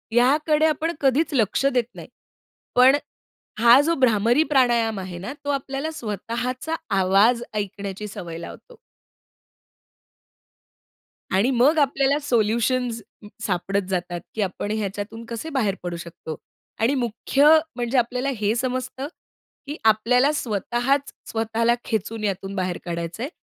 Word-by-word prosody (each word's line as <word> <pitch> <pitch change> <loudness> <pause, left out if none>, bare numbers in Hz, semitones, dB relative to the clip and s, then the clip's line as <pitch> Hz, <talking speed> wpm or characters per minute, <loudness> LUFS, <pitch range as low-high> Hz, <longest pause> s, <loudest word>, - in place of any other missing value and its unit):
याकडे 300 +5 +3
आपण 315 +1 +1
कधीच 285 +4 +2
लक्ष 230 0 +1
देत 255 -3 +3
नाही. - - -9 0.7
पण 255 +2 +7 0.6
हा 235 +3 +8
जो 335 - +2
भ्रामरी 235 +4 +4
प्राणायाम 235 -5 +3
आहे 185 -2 -6
ना, 200 +9 -6
तो 285 - -2
आपल्याला 275 +2 -3
स्वतःचा 245 - -4 0.2
आवाज 205 +6 +4
ऐकण्याची 200 0 -4
सवय 170 -4 -7
लावतो. 485 - -10 2.6
आणि 200 +8 +3
मग 265 +6 +4
आपल्याला 280 0 +2
सोल्युशन्स 235 -1 +1 0.4
सापडत 195 +1 0
जातात, 175 -2 -2
की 220 - -1
आपण 200 +1 -2
ह्याच्यातून 210 +1 -4
कसे 235 +7 -6
बाहेर 225 -9 0
पडू 175 -1 -3
शकतो 165 -2 -8 0.5
आणि 245 +5 +3
मुख्य 260 +3 +1 0.3
म्हणजे 240 +1 -1
आपल्याला 250 +2 0
हे 210 0 +1
समजतं, 255 +2 -3 0.6
की 295 +2 -5
आपल्याला 245 +6 +4
स्वतःच 245 +3 -1 0.2
स्वतःला 225 +1 +1
खेचून 220 0 -3
यातून 195 -1 -3
बाहेर 185 -2 -2
काढायचं 170 +5 -4
आहे. 275 - -3
235 Hz, 125 wpm, -23 LUFS, 205-265 Hz, 2.6 s, हा